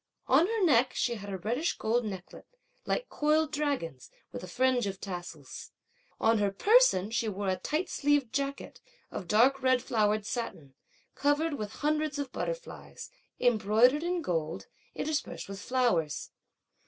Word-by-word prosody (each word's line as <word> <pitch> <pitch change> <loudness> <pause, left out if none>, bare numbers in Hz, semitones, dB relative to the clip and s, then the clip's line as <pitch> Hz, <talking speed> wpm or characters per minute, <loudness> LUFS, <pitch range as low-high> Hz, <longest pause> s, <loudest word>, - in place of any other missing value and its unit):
On 295 +7 +4
her 445 -3 +1
neck, 255 -5 +3
she 240 - +1
had 205 -3 -7
a 195 - -3
reddish 240 - -1
gold 235 +2 +1
necklet, 190 -3 -8 0.4
like - - -1
coiled 305 +1 +1
dragons, 280 - -2 0.2
with - - -6
a - - -7
fringe 250 +3 +1
of 190 -1 -5
tassels. 175 -7 -7 0.5
On 225 0 +3
her 205 -1 +2
person, 310 - +4
she 230 -1 0
wore 200 -1 -2
a 185 - +2
tight 305 - -2
sleeved 285 -4 +1
jacket, 280 0 -3 0.3
of 185 - -6
dark 255 +8 +4
red 255 -1 +4
flowered 215 -3 +1
satin, 165 - -5 0.4
covered 290 +3 +1
with 210 -7 -4
hundreds 305 -1 +1
of 280 -3 -4
butterflies, - - -6 0.3
embroidered 240 +4 +4
in 350 0 -1
gold, 165 - -2 0.3
interspersed 305 0 -3
with 195 0 -7
flowers. 235 - 0
245 Hz, 150 wpm, -30 LUFS, 200-290 Hz, 0.5 s, On